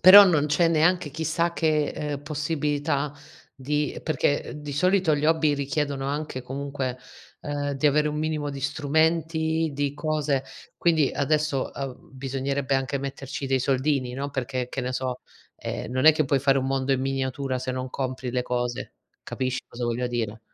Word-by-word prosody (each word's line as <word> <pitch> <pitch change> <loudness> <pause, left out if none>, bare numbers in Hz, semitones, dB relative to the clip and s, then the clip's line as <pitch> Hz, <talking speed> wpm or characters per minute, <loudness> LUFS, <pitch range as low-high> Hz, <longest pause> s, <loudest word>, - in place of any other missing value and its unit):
Però 200 +2 +11
non 155 -6 +3
c'è 160 +3 +3
neanche 165 0 +3
chissà 160 +3 0
che, 155 -3 +2
ehm, 145 -2 -4
possibilità 145 -1 -1 0.4
di 145 +2 -1
perché 145 -2 0
di 150 -1 -6
solito 180 +2 +3
gli 145 - -2
hobby 160 -2 +3
richiedono 140 -1 -1
anche 145 -2 -3
comunque, 135 0 -3 0.4
ehm, 145 -1 -2
di 140 +2 +1
avere 150 +1 +3
un 150 - -3
minimo 155 -1 -1
di 140 -1 -6
strumenti, 160 +2 +1
di 145 0 -1
cose. 150 -3 0 0.3
Quindi 160 -5 +3
adesso, 150 -1 0
uhm, 135 -2 -6
bisognerebbe 135 +1 -2
anche 135 +1 -1
metterci 135 0 -5
dei 135 0 +2
soldini, 130 0 +1
no. 140 +3 -3
Perché 130 -2 -2
che 135 - -3
ne 125 0 -2
so, 130 -1 -2 0.4
ehm, - - -5
non 130 +1 0
è 160 - +10
che 155 0 +1
puoi 135 0 +2
fare 135 0 +3
un 130 - -1
mondo 135 0 +1
in 130 - +1
miniatura 135 0 -1
se 130 0 -3
non 130 0 -4
compri 130 -1 -3
le 125 0 0
cose. 125 -1 -2 0.3
Capisci 130 -1 -2
cosa 120 0 -5
voglia 120 +1 0
dire? 115 -3 -3
140 Hz, 170 wpm, -26 LUFS, 130-155 Hz, 0.4 s, Però